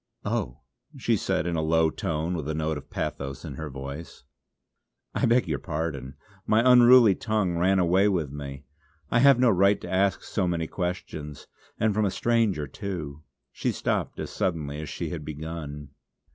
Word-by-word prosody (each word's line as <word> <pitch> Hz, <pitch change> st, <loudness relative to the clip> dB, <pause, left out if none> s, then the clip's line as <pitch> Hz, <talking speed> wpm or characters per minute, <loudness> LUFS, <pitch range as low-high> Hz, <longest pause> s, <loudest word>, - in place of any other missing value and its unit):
"Oh," -, -, -2 dB, 0.4 s
she -, -, +1 dB
said -, -, -1 dB
in 85 Hz, -1 st, -1 dB
a 80 Hz, -, 0 dB
low 80 Hz, 0 st, +3 dB
tone 85 Hz, -4 st, -2 dB
with 80 Hz, -4 st, -3 dB
a 80 Hz, -, -1 dB
note 80 Hz, -1 st, -1 dB
of -, -, -17 dB
pathos 70 Hz, -1 st, -4 dB
in -, -, -6 dB
her 80 Hz, +2 st, -6 dB
voice, 70 Hz, +2 st, -8 dB, 0.9 s
"I -, -, +1 dB
beg 120 Hz, -2 st, +3 dB
your 75 Hz, -4 st, -1 dB
pardon! 75 Hz, -5 st, -4 dB, 0.3 s
my 110 Hz, +2 st, +4 dB
unruly 125 Hz, -3 st, +8 dB
tongue 105 Hz, -3 st, -1 dB
ran 95 Hz, +2 st, +3 dB
away 95 Hz, +3 st, +3 dB
with 85 Hz, -8 st, 0 dB
me. 70 Hz, -1 st, -7 dB, 0.5 s
I 115 Hz, -, +4 dB
have 140 Hz, 0 st, +7 dB
no 125 Hz, -2 st, +4 dB
right 100 Hz, +2 st, +4 dB
to -, -, -7 dB
ask 95 Hz, 0 st, +1 dB
so 95 Hz, -4 st, -1 dB
many 85 Hz, -2 st, -1 dB
questions 80 Hz, -5 st, -5 dB, 0.3 s
and 110 Hz, -1 st, +2 dB
from 105 Hz, +1 st, +1 dB
a -, -, +2 dB
stranger 110 Hz, -8 st, +1 dB
too!" 75 Hz, -3 st, -6 dB, 0.3 s
She -, -, -1 dB
stopped -, -, -2 dB
as -, -, -5 dB
suddenly 75 Hz, -4 st, -2 dB
as 75 Hz, -, -6 dB
she -, -, -4 dB
had 80 Hz, -4 st, -5 dB
begun. 75 Hz, -2 st, -6 dB
85 Hz, 175 wpm, -26 LUFS, 75-100 Hz, 0.9 s, unruly